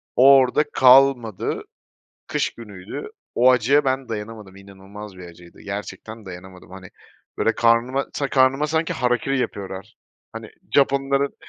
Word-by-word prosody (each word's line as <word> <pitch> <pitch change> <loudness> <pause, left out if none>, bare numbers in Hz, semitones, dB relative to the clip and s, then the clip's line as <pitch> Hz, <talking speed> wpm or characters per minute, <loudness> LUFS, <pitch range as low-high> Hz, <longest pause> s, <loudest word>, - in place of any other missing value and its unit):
o, 135 +2 +7
orada 130 +3 +2
kalmadı, 125 -5 +3 0.6
kış - - -2
günüydü. 105 - -9 0.3
O 125 +2 +5
acıya 130 +4 +2
ben 130 -1 -2
dayanamadım, 105 -3 -7
inanılmaz 100 +1 -12
bir 90 - -10
acıydı, 85 0 -16
gerçekten 105 +2 -8
dayanamadım. 90 0 -12
Hani, 95 -1 -11 0.5
böyle 115 - 0
karnıma 120 +4 +1
ta 140 -1 -3
karnıma 135 +2 +2
sanki 160 +1 -1
harakiri 125 +2 -1
yapıyorlar. 95 -5 -6 0.4
Hani - - -9 0.3
Japonların 140 0 +1
115 Hz, 125 wpm, -21 LUFS, 100-135 Hz, 0.6 s, o